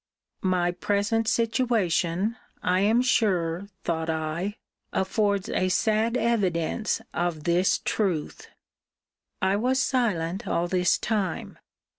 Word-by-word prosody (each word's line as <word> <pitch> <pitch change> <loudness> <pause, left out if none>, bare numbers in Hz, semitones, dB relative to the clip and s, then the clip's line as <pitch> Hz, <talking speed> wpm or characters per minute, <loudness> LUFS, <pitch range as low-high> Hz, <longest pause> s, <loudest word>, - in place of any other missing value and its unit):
My 180 -2 +1
present 205 +5 0
situation, 225 -5 +1 0.3
I 180 0 +2
am 220 +5 +3
sure, 190 -7 +1 0.2
thought 160 -1 -1
I, 160 +5 -2 0.4
affords 200 +1 0
a 185 - 0
sad 220 +5 +2
evidence 210 -4 0
of 170 -3 -1
this 175 +3 +3
truth! 185 -8 -1 1.0
I 190 +1 +3
was 255 +4 +1
silent 205 -8 0
all 170 +1 0
this 180 0 +2
time. 200 -6 -2
190 Hz, 105 wpm, -26 LUFS, 175-225 Hz, 1.0 s, am